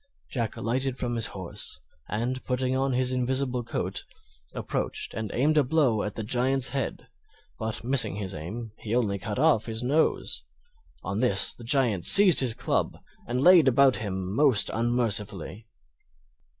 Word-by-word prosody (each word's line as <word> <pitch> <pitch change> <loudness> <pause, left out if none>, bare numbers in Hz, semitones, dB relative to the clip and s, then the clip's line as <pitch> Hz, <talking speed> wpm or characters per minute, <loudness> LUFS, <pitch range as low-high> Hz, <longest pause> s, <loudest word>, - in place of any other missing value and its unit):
Jack 115 -5 -3
alighted 130 +3 -2
from 120 -2 -3
his 115 -1 +1
horse, 95 -4 -7 0.3
and, 120 +5 -3
putting 130 0 -1
on 135 0 0
his 130 0 0
invisible 130 0 -1
coat, - - -4 0.5
approached - - -4
and 110 -2 -4
aimed 150 +5 +2
a - - +3
blow 130 -6 +1
at 105 - -4
the 110 - -4
Giant's 130 +3 +1
head, 135 -1 -4 0.5
but 110 +1 -4
missing 120 -4 +2
his 100 -2 -5
aim 105 +9 -7
he 110 +1 -3
only 105 -5 0
cut 105 +1 -5
off 140 -6 +2
his 110 +1 -3
nose. 145 +6 0 0.6
On 100 +3 -3
this 105 -5 +2
the 120 - -13
Giant 115 -7 +1
seized 190 - +8
his 125 -4 +1
club - - -2 0.3
and 125 +1 -2
laid 175 -4 +7
about 130 -2 +4
him 95 -3 -4
most 130 -5 +3
unmercifully. 110 -4 -1
120 Hz, 155 wpm, -26 LUFS, 105-130 Hz, 0.6 s, seized